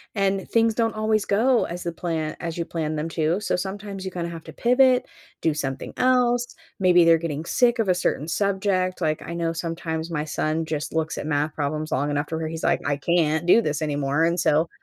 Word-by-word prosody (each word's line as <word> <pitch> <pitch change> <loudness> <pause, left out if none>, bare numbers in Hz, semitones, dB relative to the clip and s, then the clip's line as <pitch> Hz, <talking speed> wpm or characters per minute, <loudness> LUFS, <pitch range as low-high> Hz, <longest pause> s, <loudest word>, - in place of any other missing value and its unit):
And 195 -1 0
things 225 -1 +3
don't 225 -1 0
always 215 -1 +1
go 235 +4 +3
as 175 +1 -6
the 170 - -2
pla 170 +1 -5 0.3
as 170 -1 -4
you 170 - -1
plan 155 -2 -3
them 155 +2 -3
to. 165 +5 0
So - - 0
sometimes 195 +1 -5
you 190 - -4
kinda 170 -1 -4
have 165 -1 -9
to - - -10
pivot, 250 +1 +4 0.4
do 160 -2 +2
something 135 -3 -4
else, 245 -1 +2 0.2
maybe 180 -2 +5
they're 165 0 +6
getting 160 -2 -4
sick 240 +6 +2
of 205 -4 +1
a 180 - +4
certain 160 -3 -1
subject. 190 -1 0
Like, 155 -1 0
I 170 - -6
know 165 -1 -1
sometimes 165 -1 -4
my 150 -2 -2
son 155 +1 -1
just 155 -1 -4
looks 160 0 -1
at 150 - -4
math 150 +1 0
problems 155 +1 -3
long 140 +3 0
enough 145 +1 -1
to 160 - -3
where 160 - -3
he's 160 0 -6
like, - - +2
"I 145 0 +1
can't 160 +1 +1
do 220 +6 +6
this 150 -4 -2
anymore." 145 0 0
And 170 +1 +1
so, 160 0 +2
170 Hz, 225 wpm, -24 LUFS, 155-195 Hz, 0.4 s, they're